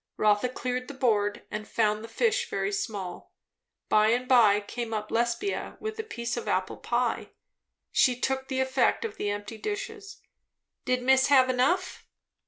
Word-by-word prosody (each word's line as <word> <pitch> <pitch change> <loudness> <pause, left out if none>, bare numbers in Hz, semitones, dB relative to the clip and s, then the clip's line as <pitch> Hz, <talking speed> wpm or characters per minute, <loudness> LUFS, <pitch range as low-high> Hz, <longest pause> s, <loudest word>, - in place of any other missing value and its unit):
Rotha 210 +3 +3
cleared 250 0 -3
the 285 - -8
board, 210 -5 +1
and 215 0 -5
found 215 -1 +1
the - - -7
fish 470 - 0
very 195 +1 -1
small. 195 -2 -5 0.5
By 215 0 +4
and 245 +3 +1
by 225 -6 +6
came 225 +2 -5
up 215 0 -4
Lesbia 235 - -1
with 435 0 -5
a - - -1
piece 235 - -4
of 240 - -5
apple 185 0 -1
pie. 240 0 -1 0.6
She 250 -1 +3
took 265 +1 -1
the 265 -1 -1
effect 265 - +1
of 435 - -6
the 205 - -2
empty 205 +2 -5
dishes. 425 -1 -5 0.7
"Did 250 0 0
miss 265 +1 +4
have 260 -2 +5
enough?" 315 +9 0
245 Hz, 165 wpm, -27 LUFS, 215-265 Hz, 0.7 s, by